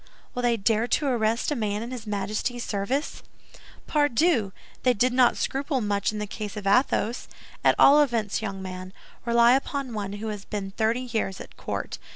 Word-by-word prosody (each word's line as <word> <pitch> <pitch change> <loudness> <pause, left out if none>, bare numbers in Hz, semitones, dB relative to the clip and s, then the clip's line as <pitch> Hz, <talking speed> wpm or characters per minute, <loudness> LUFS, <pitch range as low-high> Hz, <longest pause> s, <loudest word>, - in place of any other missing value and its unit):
Will 250 - -2
they 240 -1 +2
dare 220 +2 +1
to 290 - +1
arrest 235 -1 +1
a - - +1
man 210 -2 -2
in 235 - -7
his 240 -4 -7
Majesty's 210 +4 -2
service?" 240 +9 -2 0.6
"Pardieu! 290 - +2 0.3
They 250 -1 +3
did 245 +4 +2
not 250 -1 +4
scruple 275 0 -1
much 205 -3 0
in 215 - -6
the 210 - -2
case 210 0 -6
of 205 - -6
Athos. 235 +2 +2 0.4
At - - +5
all 290 +2 +7
events, 230 -8 0
young 195 -3 -4
man, 185 0 -7 0.3
rely 235 0 +5
upon 270 -1 -1
one 200 -2 -4
who 215 +2 -4
has 205 -2 -5
been 200 -2 -5
thirty 225 +4 0
years 225 -6 -2
at - - -11
court. - - -5
225 Hz, 185 wpm, -26 LUFS, 205-250 Hz, 0.6 s, all